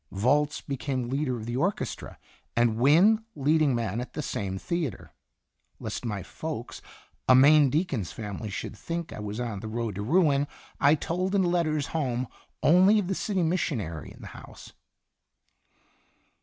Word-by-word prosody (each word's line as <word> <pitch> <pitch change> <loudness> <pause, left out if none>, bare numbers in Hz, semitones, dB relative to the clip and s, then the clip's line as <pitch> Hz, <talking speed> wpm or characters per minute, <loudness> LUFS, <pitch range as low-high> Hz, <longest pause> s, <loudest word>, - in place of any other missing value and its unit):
Volz 145 +9 +1
became 130 -2 -3
leader 135 -2 -1
of 110 - -7
the 120 +1 -3
orchestra, 175 +10 -2 0.4
and 120 -2 +2
Wynne, 175 - +5
leading 150 -1 +2
man 115 -1 -2
at 125 - -8
the 150 - -4
same 95 -6 -3
theatre. 160 - -4 0.7
Lest - - -5
my 105 -5 -3
folks, - - -6 0.5
a 130 - +8
Maine 145 +2 +7
deacon's 140 - -1
family, 105 -1 -6
should 100 - -5
think 170 +8 -5
I - - -7
was 105 +2 -5
on 115 -5 -3
the 110 - -7
road 115 -1 -3
to 100 - -5
ruin, 145 - +3 0.3
I 145 +2 +5
told 180 +5 -2
in 195 - +4
letters 165 -5 +1
home 130 -5 -1 0.4
only 185 +6 +6
of 195 -3 0
the - - +1
city 190 -1 -1
missionary 115 - -2
in - - -14
the - - -9
house. - - -12
140 Hz, 155 wpm, -27 LUFS, 115-165 Hz, 0.7 s, a